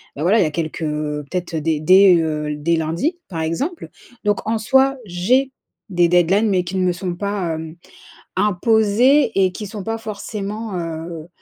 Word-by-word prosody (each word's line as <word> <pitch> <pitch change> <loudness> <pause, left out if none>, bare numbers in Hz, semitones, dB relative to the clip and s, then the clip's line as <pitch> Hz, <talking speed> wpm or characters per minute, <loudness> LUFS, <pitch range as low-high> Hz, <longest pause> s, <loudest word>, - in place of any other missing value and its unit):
Beh, 145 - -6
voilà, 195 +7 +3
il - - +5
y - - +1
a 155 - -2
quelques, 160 +1 -4
heu, 150 -1 -3
peut-être, 180 -2 -4
heu, 160 - -1
dès 155 -1 0
dès, 185 +2 +7
heu, 155 -2 -1
l 150 0 -5
dès 170 +2 +2
lundi, 170 - -1
par 165 -4 -5
exemple. 270 - -3 0.3
Donc 205 0 0
en 225 +1 +1
soi, 265 +5 +3
j'ai 240 +9 +1 0.4
des 175 -2 +3
deadlines 180 +5 +3
mais 185 -2 +2
qui 180 +2 -4
ne 185 - +1
me 180 - +2
sont 175 0 -4
pas, 195 -4 -2
hem, 160 0 -7 0.6
imposées 220 +6 +3
et 190 -1 +3
qui 210 +3 -6
sont 200 -1 -7
pas 225 0 -3
forcément 215 0 -5
heu, 165 0 -6
185 Hz, 195 wpm, -20 LUFS, 165-215 Hz, 0.6 s, dès